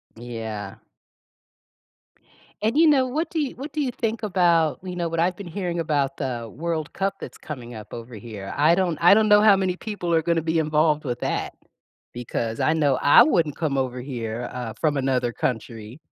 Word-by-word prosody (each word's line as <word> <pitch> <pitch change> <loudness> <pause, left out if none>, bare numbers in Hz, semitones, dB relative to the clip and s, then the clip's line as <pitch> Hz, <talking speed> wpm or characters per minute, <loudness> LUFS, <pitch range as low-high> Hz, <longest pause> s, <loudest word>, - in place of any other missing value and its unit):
D 115 - -14
yeah. 110 -4 -6 1.9
And 220 +6 0
you 325 +1 +6
know, 270 -4 +4
what 305 +7 -2
do 305 -5 -1
what 280 +3 -8
do 305 - -1
you 265 -3 -1
think 225 -1 -3
about, 170 -6 +2
you 180 -1 -6
know, 170 -1 -2
what 165 0 -3
I've 175 +2 +2
been 200 -1 -9
hearing 175 -1 -3
about 145 -4 0
the 120 -4 -4
World 165 -1 -3
Cup 195 0 -1
that's - - -9
coming 125 -6 -8
up 110 -1 -10
over 115 0 -8
here, 105 -3 -8
I 155 +4 +4
don't 175 -4 0
I 175 +3 +8
don't 215 +1 +4
know 210 0 +7
how 210 -2 +7
many 190 -2 0
people 185 -4 -4
are 165 - +4
gonna 165 +1 +1
be 160 +1 0
involved 150 0 +2
with 125 -4 -3
that - - -2 0.6
because 115 -2 -4
I 155 - +3
know 145 -4 +2
I 145 - +7
wouldn't 165 - +1
come 150 -4 -1
over 125 -1 -2
here, 120 -3 -4
uh, 125 -3 -5
from 150 -2 +1
another 130 -3 0
country 115 0 -4
155 Hz, 195 wpm, -24 LUFS, 125-185 Hz, 1.9 s, I